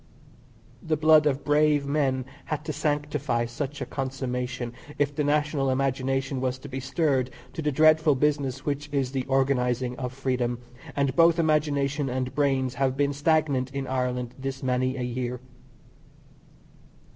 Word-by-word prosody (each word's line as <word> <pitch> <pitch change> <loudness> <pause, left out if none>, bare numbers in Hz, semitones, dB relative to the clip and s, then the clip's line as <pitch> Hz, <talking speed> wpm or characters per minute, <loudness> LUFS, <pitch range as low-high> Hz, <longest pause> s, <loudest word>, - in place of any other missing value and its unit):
The 160 -4 0
blood 155 0 +6
of 140 -1 0
brave 150 -1 +3
men 135 -3 0 0.2
had 155 -1 -4
to 155 - -3
sanctify 145 -5 -1
such 135 +4 -5
a - - -1
consummation 125 -2 -3 0.2
if 145 0 0
the 150 - 0
national 145 -1 +1
imagination 135 0 0
was 130 0 -1
to 130 - -10
be 135 -1 -5
stirred 135 -1 0 0.2
to - - -4
the 150 -1 0
dreadful 155 +1 +5
business 140 -1 0
which 145 0 -2
is 135 -3 0
the 130 -2 -2
organizing 130 -2 +1
of 125 -2 -3
freedom, 125 -2 -1 0.4
and 140 -2 +1
both 165 0 +5
imagination 145 -3 +1
and 130 0 -2
brains 135 -3 +1
have 130 0 0
been 145 0 +2
stagnant 145 -3 +1
in 135 -1 -2
Ireland 125 -2 -2
this 135 0 -4
many 130 0 0
a 125 - -2
year. 125 0 -3
135 Hz, 150 wpm, -26 LUFS, 130-145 Hz, 0.4 s, blood